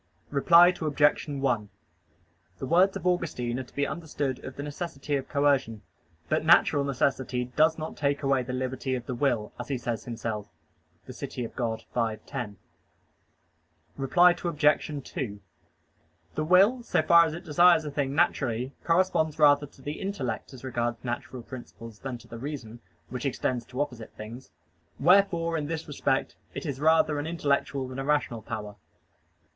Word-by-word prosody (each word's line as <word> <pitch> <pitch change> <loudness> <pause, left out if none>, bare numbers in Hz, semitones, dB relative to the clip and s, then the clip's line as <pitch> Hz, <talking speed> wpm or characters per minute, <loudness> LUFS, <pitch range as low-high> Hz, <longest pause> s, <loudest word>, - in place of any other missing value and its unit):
Reply 170 +5 +7
Obj. 150 -5 +1
1: 130 -7 -1 0.9
The - - -5
words 180 +6 +4
of - - -10
Augustine 140 -9 0
are - - -3
to 125 - -20
be 145 - +1
understood 145 -6 -3
of 130 - -7
the 140 - -5
necessity 145 -1 -4
of 135 -1 -3
coercion. 135 -6 +1 0.4
But - - +1
natural 160 -3 +5
necessity 130 -2 0
"does 160 +1 +4
not 155 0 -5
take 145 0 0
away 135 -1 +2
the 125 +1 -5
liberty 130 +1 -2
of 120 -1 -5
the 125 - -4
will," 120 -4 0
as - - -5
he 140 - -1
says 120 -2 -4
himself 110 -3 -4 0.6
(De - - -9
Civ. - - -6
Dei 115 -2 -3
v, 115 -3 0
10). 115 -7 -5 1.4
Reply 175 +6 +4
Obj. 150 -3 +2
2: 120 - -5 0.9
The 155 - -1
will, 195 +9 +5
so 195 - +1
far 170 +1 +7
as 160 -1 -3
it 175 +2 -9
desires 170 0 +5
a 150 - -4
thing 140 -1 -1
naturally, 130 -3 +1
corresponds 165 -3 +2
rather 145 -1 +5
to 135 - -20
the 145 +3 -5
intellect 135 - -3
as 130 -2 -12
regards 120 -2 -2
natural 120 0 -5
principles 115 -3 -10
than 130 -2 -5
to 120 - -17
the 115 - -9
reason, 125 -4 -6 0.3
which 125 +2 -3
extends 125 -2 -2
to 125 - -8
opposite 125 -6 -4
things. 115 +4 -9 0.5
Wherefore 170 -1 +4
in 145 - -4
this 160 0 -4
respect 135 -2 -1 0.2
it - - -5
is 140 -4 -3
rather 155 -1 +3
an 145 - -3
intellectual 140 -4 0
than 130 +1 -7
a - - -2
rational 145 -5 0
power. 105 -3 -6
140 Hz, 165 wpm, -27 LUFS, 125-155 Hz, 1.4 s, Reply